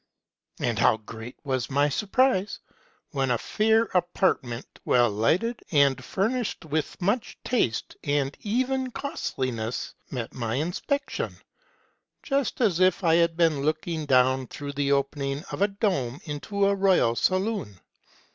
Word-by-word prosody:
But - - -1
how - - +4
great 115 +2 -9
was 130 -3 -1
my 145 +1 +3
surprise 205 - +1 0.5
when 135 -3 0
a 120 - +2
fair 220 - +2
apartment, 175 - 0
well 120 -2 +3
lighted, 180 - +1
and 140 -4 +3
furnished 220 - -1
with 155 0 -2
much 205 +6 -1
taste 125 - 0
and 145 -1 0
even 260 +4 0
costliness, 130 - -3 0.2
met 120 -4 -5
my 115 -2 -2
inspection; 180 - -2 0.9
just 275 -3 -1
as 195 -8 +3
if 185 +1 +3
I 165 -2 +4
had 170 0 +3
been 165 -5 +3
looking 155 +1 -1
down 130 0 +3
through 145 0 -6
the 140 0 0
opening 140 +1 0
of - - -5
a 200 - +5
dome 185 - -1
into 195 +7 -1
a 200 - +3
royal 190 -12 +3
saloon 185 - 0
155 Hz, 135 wpm, -26 LUFS, 130-200 Hz, 0.9 s, a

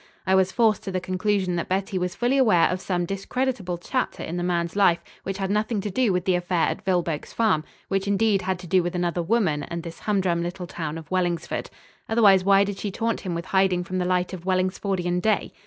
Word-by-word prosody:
I 190 - +2
was 190 -1 +3
forced 220 -2 +2
to 195 - -3
the 185 - -1
conclusion 185 0 0
that 170 - -3
Betty 190 +1 -1
was 180 -1 -2
fully 245 +3 +1
aware 215 -10 +5
of 180 0 -2
some 175 -2 -1
discreditable 195 0 -2
chapter 255 +9 -2
in 165 - -4
the 175 - -2
man's 175 -1 -1
life 195 -4 +4 0.2
which 195 0 -4
had 195 0 -2
nothing 215 +1 0
to 205 0 -4
do 235 +2 +2
with 180 0 -1
the 185 - +3
affair 175 -1 +1
at - - -5
Vilboek's 175 -5 -1
Farm, 215 -9 +2 0.2
which, 195 0 -1
indeed, 200 0 +2
had 190 0 -1
to 180 - -11
do 185 +2 +3
with 175 +1 -3
another 175 -1 0
woman 175 -6 +1
and 170 +2 -5
this 170 -1 -8
humdrum 190 -5 0
little 175 +1 -4
town 160 -2 -5
of 160 0 -11
Wellingsford. 175 -3 -1 0.4
Otherwise 205 -5 +5
why 195 +1 +5
did 200 -1 -4
she 205 - -2
taunt 230 +4 -2
him 180 -3 -3
with 170 +1 -4
hiding 190 -2 +2
from 185 +1 -3
the 180 - 0
light 180 0 0
of 180 -2 -7
Wellingsfordian 185 -1 0
day? 215 +1 0
185 Hz, 225 wpm, -24 LUFS, 175-200 Hz, 0.4 s, aware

